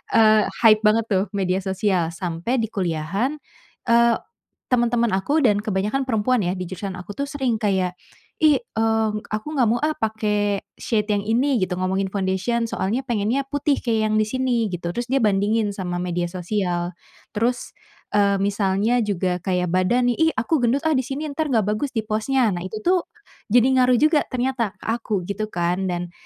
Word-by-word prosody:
eee, 215 -1 +5 0.2
hype 215 -2 +7
banget 225 +1 +3
tuh 190 -1 +3
media 185 -1 0
sosial, 190 -3 0
sampai 175 +8 -2
di 225 - -1
kuliahan, 185 - -1 0.6
eee, 235 0 +5 0.5
teman-teman 235 -3 +2
aku 280 +11 +1
dan 205 -1 +2
kebanyakan 210 +6 -1
perempuan 240 -1 +1
ya, 175 0 0
di 180 - -4
jurusan 185 +1 -6
aku 180 +3 -8
tuh 280 - -3
sering 265 -5 -1
kayak 190 -4 0 0.5
"Ih, 300 -2 +6
eee, 225 - 0 0.2
aku 215 0 -3
gak 245 -4 +3
mau 240 - +2
ah 305 +1 0
pake 210 -2 0 0.2
shade 210 -3 -1
yang 200 - 0
ini," 250 +5 +2
gitu 185 0 -1
ngomongin 190 +1 -1
foundation, 200 +5 0
"soalnya 220 +4 -1
pengennya 235 +4 0
putih 285 0 0
kayak 220 -3 0
yang - - +1
di 215 - +1
sini," 250 -2 0
gitu, 175 -2 -4
terus 240 +3 -3
dia 270 0 +1
bandingin 205 +1 +2
sama 180 -3 -4
media 175 -1 -2
sosial. 180 -1 -2 0.4
Terus, 240 +3 -1 0.4
eee, 200 -1 +3
misalnya 200 +4 +1
juga 185 -4 -1
kayak 180 -1 -1
badan 240 +7 +2
nih, - - -5
"Ih - - -6
aku 260 +4 +1
gendut 245 +4 +1
ah 315 - +2
di - - +3
sini, 275 +3 -4
entar 305 +2 -2
gak 225 -6 +2
bagus 215 +8 -1
di 220 - +1
post-nya." 220 +1 +1
Nah 175 - -3
itu 215 - -7
tuh 360 0 +2 0.4
jadi 240 +3 +4
ngaruh 250 0 +4
juga 305 +3 +4
ternyata 250 -4 -2
ke - - -16
aku 220 -4 -2
gitu 205 +3 -3
kan. 180 0 -1
Dan 175 0 -4
215 Hz, 180 wpm, -22 LUFS, 190-245 Hz, 0.6 s, hype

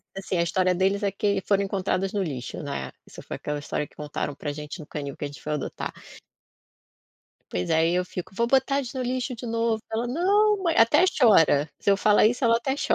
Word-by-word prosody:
assim, 195 -2 -3
a 170 - +3
história 180 +1 +1
deles 195 +2 +1
é 200 -1 0
que 200 0 0
foram 200 -1 +3
encontradas 195 0 -1
no 200 - 0
lixo, 140 -7 -5
né. 140 - -5 0.2
Isso - - -11
foi - - -6
aquela 150 0 -4
história 150 0 -3
que - - -27
contaram 150 -1 -4
pra 145 - -4
gente 150 +4 -7
no 150 - -8
canil 140 -2 -6
que 145 - -4
a - - -2
gente 145 - -12
foi 150 - -3
adotar. 150 - -4 1.6
Pois, 90 0 -2
aí 165 +2 +3
eu 180 0 +1
fico: 180 +1 -7
"Vou 235 +4 0
botar 270 +2 +2
eles 260 -2 -4
no 260 - -2
lixo 250 +1 -2
de 235 - -9
novo". 230 -1 0
Ela: 230 +2 -1
"Não, 405 - +3
ma", 335 - +2
até 230 +10 +6
chora, 190 - +4
se 200 - +2
eu 195 - +5
falar 210 +1 +4
isso 245 +3 0
ela 230 0 +5
até 265 +3 -2
cho - - +1
195 Hz, 225 wpm, -25 LUFS, 155-240 Hz, 1.6 s, até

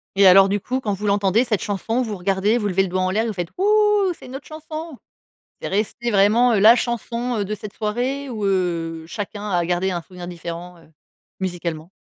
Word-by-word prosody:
Et 195 0 +6
alors 195 +1 +8
du 205 +1 0
coup, 255 +6 -2
quand 215 -6 -2
vous 205 +2 -4
l'entendez 200 +2 +3
cette 220 -8 -1
chanson, 225 +4 -1
vous 215 -4 -4
regardez, 195 +5 +1
vous 205 - -1
levez 195 0 +2
le 190 - -3
doigt 185 +1 -1
en 185 - +1
l'air, 220 +4 0
vous 225 - -2
faites: 175 -3 -3
«Hou, 380 - 0 0.5
c'est - - -14
notre 270 +2 -8
chanson!». 310 -1 -8 0.7
C'est - - -3
resté 220 +4 -1
vraiment, 215 +5 +4
heu, - - +3
la 220 +4 +8
chanson, 240 0 -2
heu, 205 - 0
de 210 +2 -3
cette 210 -1 -9
soirée 250 +6 -2
ou, 220 -5 -4
heu, 170 -4 -1
chacun 205 +3 -6
a 175 -2 +1
gardé 180 +2 0
un 175 -1 -3
souvenir 180 0 -10
différent, 175 0 -7
heu, 165 - -21 0.5
musicalement? 175 -3 -4
200 Hz, 215 wpm, -22 LUFS, 180-235 Hz, 0.7 s, alors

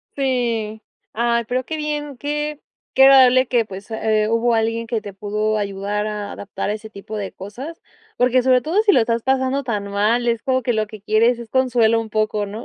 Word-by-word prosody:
Sí. 235 -5 -1 0.3
Ay, 235 +1 +1
pero 255 +2 -1
qué 315 - -4
bien, 295 -2 -4
que 295 +2 -3 0.4
que 265 - +6
agradable, 260 -2 +7
eh, 260 - -4
que, 235 -3 +1
pues, 195 +1 -10
hubo 220 +1 +1
alguien 225 +1 0
que 225 -1 -2
te 205 -2 -9
pudo 210 +2 -1
ayudar 200 +1 -2
a 210 -1 -4
adaptar 200 0 -5
a - - 0
ese 220 0 -8
tipo 215 +1 -8
de 200 -2 -4
cosas, 250 - -9 0.4
porque 245 0 +2
porque 255 -1 +4
sobre 255 -1 +4
todo 330 - 0
si 425 - +5
lo 305 - +4
estás 230 0 0
pasando 265 +1 +1
tan 210 -5 -3
mal, 215 +4 +1
es 230 -1 0
como 260 -1 +1
que 245 0 0
lo 215 -1 0
que 215 -1 -12
quieres 230 +3 +2
es 235 -2 -9
consuelo 240 -3 +2
un 225 -1 -6
poco, 215 -1 0
¿no? 210 +4 -7
230 Hz, 215 wpm, -20 LUFS, 215-255 Hz, 0.4 s, agradable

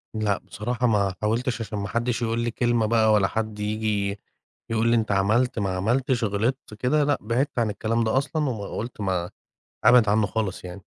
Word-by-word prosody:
لأ، 105 -2 +1
بصراحة 120 +3 -2
ما 100 -3 +2
حاولتش 115 +3 0
عشان 105 -1 -5
ما 100 - -3
حدش 120 +2 -1
يقول 115 0 0
لي 120 0 -1
كلمة 120 -2 +1
بقى، 110 -1 +3
ولا 100 -2 +4
حد 110 -1 -3
ييجي 105 -1 -1 0.5
يقول 115 0 +1
لي 120 - +4
أنت 110 -2 0
عملت 110 +5 +2
ما 100 - 0
عملتش، 120 +4 0
غلطت، 110 +4 -1
كده، 130 +7 +1
لأ، 145 0 +2
بعدت 125 +5 -1
عن 115 - +1
الكلام 115 +3 -1
ده 110 +4 +1
أصلًا، 150 +1 0
وم 110 -4 -4 0.2
قُلت 115 -1 -5
ما 90 -3 -1 0.6
أبعد 120 -4 +6
عنه 105 0 +3
خالص 95 -2 -3
يعني. 90 +1 -9
110 Hz, 190 wpm, -25 LUFS, 105-120 Hz, 0.6 s, أبعد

